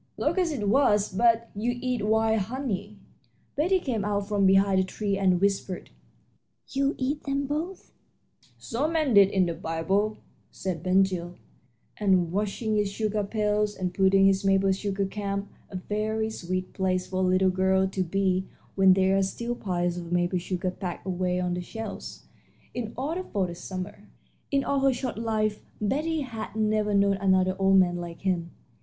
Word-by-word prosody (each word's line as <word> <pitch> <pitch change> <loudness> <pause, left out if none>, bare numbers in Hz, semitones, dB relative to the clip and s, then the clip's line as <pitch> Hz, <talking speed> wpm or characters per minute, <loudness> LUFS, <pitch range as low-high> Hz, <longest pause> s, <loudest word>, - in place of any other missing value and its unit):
"Locusts 360 -3 +1
it 210 -6 -2
was; 210 -4 +3
but 230 +2 +2
you 240 +4 -1
eat 250 -3 -2
wild 220 +1 +2
honey." 210 -2 -4 0.6
Betty 365 +6 +2
came 240 - -2
out 205 -1 -1
from 200 -2 +2
behind 195 0 +4
the - - +3
tree 200 +1 -2
and 185 -2 +2
whispered, 195 -1 -1 0.8
"You 275 +1 0
eat 280 +3 -2
them 280 0 -1
both?" 320 +7 -4 0.7
"So 270 +4 -2
men 310 -6 +1
did 200 -2 +7
in 190 -2 +2
the 170 - -2
Bible," 180 +6 -1 0.3
said 180 -4 -4
Ben 185 +2 +4
Gile, 180 -2 -3 0.6
and 185 -5 +2
washing 210 +3 -1
his 205 -1 +1
sugar 210 0 -1
pails, 210 0 0
and 180 -1 -3
putting 195 0 +4
his 195 0 +3
maple 195 0 +3
sugar 195 0 -1
camp 200 0 -3 0.2
a - - -9
very 215 +3 -2
sweet 185 -2 -4
place 185 -1 0
for 185 - -5
a - - +1
little 185 0 +3
girl 190 +1 +2
to 190 0 -2
be 190 +1 0 0.3
when 190 -1 +6
there 190 +1 +3
are - - +3
still 235 +5 -2
piles 175 -5 -2
of 170 -1 -7
maple 175 +1 +1
sugar 185 +1 -2
packed 180 -1 -6
away 180 -1 -1
on 180 -1 -1
the 180 - -2
shelves 220 +3 -7 0.5
in 225 -3 -4
order 315 +8 -2
for 200 - -1
the 175 - -5
summer. 185 +4 -7 0.4
In 275 -1 +1
all 280 - 0
her 270 0 +3
short 250 -2 -4
life 215 -2 -1 0.2
Betty 305 +9 0
had 225 -6 -6
never 215 -1 +1
known 200 0 +3
another 185 -1 +2
old 195 0 +5
man 175 -2 +3
like 170 -1 -7
him. 180 -3 -1
200 Hz, 175 wpm, -27 LUFS, 185-220 Hz, 0.8 s, did